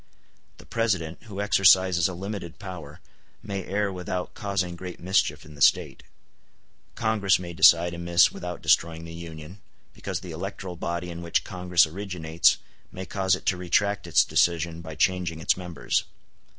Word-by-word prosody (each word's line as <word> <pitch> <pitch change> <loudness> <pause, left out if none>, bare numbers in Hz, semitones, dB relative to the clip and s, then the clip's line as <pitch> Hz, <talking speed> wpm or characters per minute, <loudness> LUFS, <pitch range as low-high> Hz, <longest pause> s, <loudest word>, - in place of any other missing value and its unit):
The - - -15
President, 95 -8 -1
who 100 -3 -8
exercises 95 -3 +4
a 95 - -6
limited 95 -2 -6
power, 95 -6 -9 0.4
may 100 -2 -4
err 100 0 -1
without 90 0 -4
causing 95 -4 -2
great 90 0 -8
mischief 95 +2 0
in 75 - -13
the 70 - -14
State. - - +3 0.9
Congress 110 -4 +2
may 85 -1 -7
decide 85 -1 +5
amiss 85 +1 +3
without 90 0 -7
destroying 80 0 +2
the 80 - -9
Union, 85 +3 -10 0.3
because - - -5
the - - -8
electoral 90 -2 -6
body 85 +1 -4
in 85 0 -7
which 85 -1 0
Congress 90 -2 +2
originates 85 -2 +1 0.3
may 95 - -7
cause 95 -1 +1
it - - -11
to 90 - +1
retract 100 +2 0
its 85 - +5
decision 85 -1 +1
by 80 -1 -8
changing 90 -1 0
its 80 - +2
members. 90 -4 -2
90 Hz, 155 wpm, -26 LUFS, 85-95 Hz, 0.9 s, decide